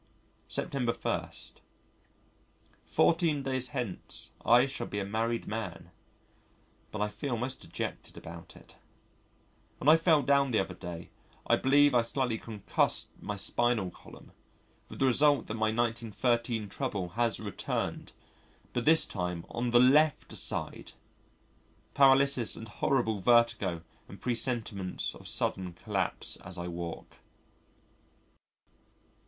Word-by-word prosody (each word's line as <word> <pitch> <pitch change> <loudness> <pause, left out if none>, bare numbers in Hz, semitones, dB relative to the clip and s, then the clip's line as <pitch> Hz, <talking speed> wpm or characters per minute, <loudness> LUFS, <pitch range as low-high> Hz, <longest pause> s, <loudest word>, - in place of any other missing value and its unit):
September 125 -4 -1
1. - - -2 1.6
Fourteen 165 -4 +2
days 130 -1 -1
hence 125 -7 -4
I 120 +2 +6
shall 135 - -5
be 100 - -5
a 100 - -2
married 115 +3 -1
man. 110 0 -6 1.0
But 105 -1 -2
I - - 0
feel 120 +4 -4
most 130 +3 -3
dejected - - -6
about 85 0 -10
it. - - -17 1.0
When - - -5
I 155 +2 +8
fell 160 -4 +4
down 140 +1 +3
the 115 - +1
other 95 - -2
day, 85 -2 -8 0.3
I - - +4
believe 145 +1 +4
I 120 - +5
slightly 115 -1 -2
concussed 110 -3 -1
my - - -4
spinal 120 -6 +1
column, - - -15 0.6
with - - -9
the 135 - +2
result 140 0 +4
that - - -5
my 110 -1 0
1913 115 0 -1
trouble 100 -5 -3
has 115 +4 0
returned, - - -4 0.6
but 120 - -2
this 160 +1 +6
time 90 -3 -4
on 120 +1 -2
the 120 0 +5
left 145 +4 +4
side! - - -2 1.0
paralysis 135 -3 +5
and 115 - -7
horrible 110 0 0
vertigo 110 -6 +2 0.2
and - - -12
presentiments 115 -6 -2
of - - -10
sudden 90 -2 -1
collapse - - -1
as 95 0 -10
I 85 0 -4
walk. 85 -1 -7
120 Hz, 125 wpm, -30 LUFS, 105-135 Hz, 1.6 s, I